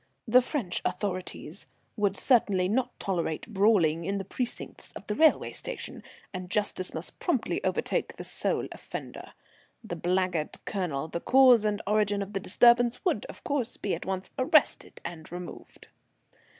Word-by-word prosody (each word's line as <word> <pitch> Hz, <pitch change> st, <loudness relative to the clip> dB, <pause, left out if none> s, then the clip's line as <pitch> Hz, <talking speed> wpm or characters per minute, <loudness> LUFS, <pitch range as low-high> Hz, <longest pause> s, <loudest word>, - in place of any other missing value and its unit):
The 250 Hz, +3 st, +6 dB
French 245 Hz, -, -2 dB
authorities 185 Hz, -2 st, -4 dB, 0.3 s
would 200 Hz, -2 st, +1 dB
certainly 205 Hz, -8 st, +3 dB
not 250 Hz, +5 st, -1 dB
tolerate 170 Hz, -5 st, -2 dB
brawling 190 Hz, -7 st, +3 dB
in 195 Hz, +4 st, -1 dB
the 195 Hz, -, -4 dB
precincts 245 Hz, +5 st, -5 dB
of -, -, -9 dB
the 210 Hz, -, -2 dB
railway 315 Hz, +8 st, +4 dB
station, -, -, -5 dB, 0.3 s
and 185 Hz, -1 st, -6 dB
justice 195 Hz, -2 st, 0 dB
must -, -, -4 dB
promptly -, -, 0 dB
overtake -, -, -1 dB
the -, -, -6 dB
sole -, -, -1 dB
offender. -, -, -8 dB, 0.5 s
The 195 Hz, -6 st, -5 dB
blackguard 180 Hz, -2 st, 0 dB
Colonel, 165 Hz, -8 st, -2 dB
the 170 Hz, -, -4 dB
cause 250 Hz, -4 st, +6 dB
and 210 Hz, 0 st, 0 dB
origin 205 Hz, -1 st, +2 dB
of 200 Hz, +2 st, -10 dB
the 195 Hz, -, -1 dB
disturbance, 240 Hz, -, +4 dB
would, 360 Hz, -, +1 dB
of -, -, -11 dB
course, 270 Hz, -5 st, -1 dB
be 200 Hz, -, -2 dB
at -, -, -5 dB
once 190 Hz, 0 st, -3 dB
arrested 275 Hz, +3 st, +2 dB
and 165 Hz, -2 st, -7 dB
removed. 175 Hz, 0 st, -9 dB
200 Hz, 150 wpm, -28 LUFS, 180-235 Hz, 0.5 s, The